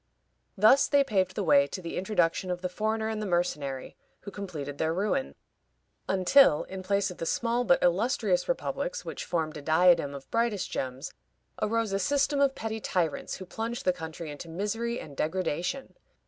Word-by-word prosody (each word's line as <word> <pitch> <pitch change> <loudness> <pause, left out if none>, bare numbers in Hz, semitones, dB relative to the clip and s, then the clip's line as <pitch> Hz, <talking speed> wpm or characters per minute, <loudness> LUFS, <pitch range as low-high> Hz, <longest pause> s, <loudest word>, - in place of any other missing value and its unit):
Thus 220 +7 +6
they 285 -1 +4
paved 190 -7 0
the 205 - -1
way 140 -4 +5
to 165 - -6
the 170 -2 -6
introduction 185 -2 0
of 180 0 -3
the 180 - -1
foreigner 220 +3 -1
and 220 -1 -3
the 210 - -3
mercenary, 150 -7 -2 0.3
who 200 - -8
completed 155 -9 -6
their 160 +1 0
ruin; 215 +8 -1 0.7
until, 190 - +5
in 190 0 -7
place 200 0 0
of 180 - -11
the 165 - -3
small 235 +5 0
but 175 -7 +3
illustrious 250 - +1
republics - - -2
which - - -5
formed 160 -3 -2
a - - -7
diadem 160 -1 +4
of 135 -1 -11
brightest 230 -4 0
gems, 130 0 -4 0.5
arose 230 -1 0
a 195 - +1
system 280 +5 +1
of 275 -1 +3
petty 220 0 -4
tyrants, 175 -7 -1
who 185 - -8
plunged 230 +5 -4
the 185 - +3
country 160 -2 -7
into 145 +3 -9
misery 225 +7 -2
and 145 - -10
degradation. 180 - -2
185 Hz, 175 wpm, -28 LUFS, 165-225 Hz, 0.7 s, Thus